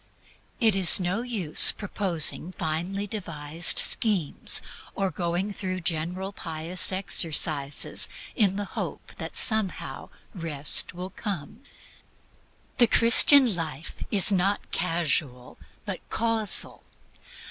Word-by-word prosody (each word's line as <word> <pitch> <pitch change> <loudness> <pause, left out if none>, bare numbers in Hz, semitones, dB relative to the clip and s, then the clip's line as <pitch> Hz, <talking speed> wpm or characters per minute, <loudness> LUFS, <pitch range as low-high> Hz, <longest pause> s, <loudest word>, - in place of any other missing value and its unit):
It 220 -5 +1
is 190 0 +7
no 185 +4 -4
use 215 -11 +4
proposing 185 -4 0
finely 175 +6 -5
devised 165 -6 -3
schemes, 195 -10 +2 0.4
or 195 -1 -3
going 180 +3 -5
through 185 -2 -6
general 175 +4 -4
pious 165 +2 -1
exercises 155 -6 +1 0.3
in 200 -5 0
the 205 0 -6
hope - - -9
that - - -9
somehow 220 -4 -1 0.2
Rest 165 -3 +1
will 180 +2 -9
come. 195 - -8 1.2
The 240 - +5
Christian 235 +1 +4
life 160 -2 -8
is 205 0 +4
not 195 +2 -3
casual, 155 -7 -3 0.3
but - - -7
causal. 225 -2 0
185 Hz, 105 wpm, -23 LUFS, 165-205 Hz, 1.2 s, is